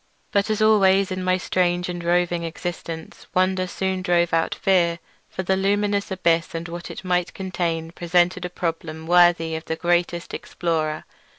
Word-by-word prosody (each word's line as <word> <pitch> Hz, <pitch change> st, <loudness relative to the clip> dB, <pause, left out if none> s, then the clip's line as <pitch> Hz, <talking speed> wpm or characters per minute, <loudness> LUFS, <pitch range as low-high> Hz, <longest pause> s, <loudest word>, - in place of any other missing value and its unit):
But 200 Hz, +2 st, +1 dB
as 215 Hz, 0 st, +1 dB
always 195 Hz, -2 st, +4 dB
in 185 Hz, 0 st, -3 dB
my 185 Hz, 0 st, +2 dB
strange 180 Hz, -1 st, 0 dB
and 175 Hz, -1 st, -5 dB
roving 175 Hz, 0 st, +1 dB
existence, 165 Hz, -1 st, -6 dB
wonder 185 Hz, 0 st, +2 dB
soon 190 Hz, 0 st, -2 dB
drove 175 Hz, -2 st, +2 dB
out 165 Hz, 0 st, +1 dB
fear; 175 Hz, -3 st, +2 dB, 0.3 s
for 190 Hz, -, -4 dB
the 190 Hz, +1 st, +1 dB
luminous 200 Hz, +1 st, 0 dB
abyss 170 Hz, -4 st, +1 dB
and 165 Hz, +1 st, -4 dB
what 170 Hz, +1 st, -7 dB
it -, -, -8 dB
might 180 Hz, -1 st, 0 dB
contain 170 Hz, -4 st, -2 dB
presented 175 Hz, +1 st, +1 dB
a 180 Hz, -, -3 dB
problem 165 Hz, -2 st, -4 dB
worthy 175 Hz, -1 st, +4 dB
of 160 Hz, -, -6 dB
the 160 Hz, -, -2 dB
greatest 175 Hz, 0 st, 0 dB
explorer. 160 Hz, -3 st, -2 dB
175 Hz, 165 wpm, -23 LUFS, 170-185 Hz, 0.3 s, always